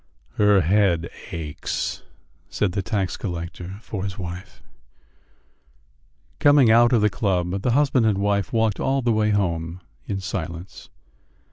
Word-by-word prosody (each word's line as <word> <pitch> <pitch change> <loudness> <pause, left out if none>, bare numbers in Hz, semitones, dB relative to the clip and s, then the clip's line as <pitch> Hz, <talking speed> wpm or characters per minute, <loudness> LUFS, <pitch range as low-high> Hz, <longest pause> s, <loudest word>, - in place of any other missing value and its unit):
"Her 105 -2 +5
head 85 -2 +2 0.2
aches," 75 -3 -4 0.5
said 100 +5 0
the 100 +2 -2
tax 95 -2 -2
collector 90 +1 -6
for 100 -4 -5
his 100 0 -5
wife. 90 +1 -8 1.8
Coming 145 -5 +6
out 120 +1 +6
of 120 -4 +3
the 105 - +4
club, 90 0 -1
the 120 +2 +1
husband 130 -4 +3
and 105 -3 +2
wife 100 -1 0
walked 110 -2 +1
all 135 0 0
the 120 - +2
way 110 0 +2
home 85 -4 -1 0.3
in 100 - -2
silence. 90 -2 -6
100 Hz, 135 wpm, -23 LUFS, 90-110 Hz, 1.8 s, Coming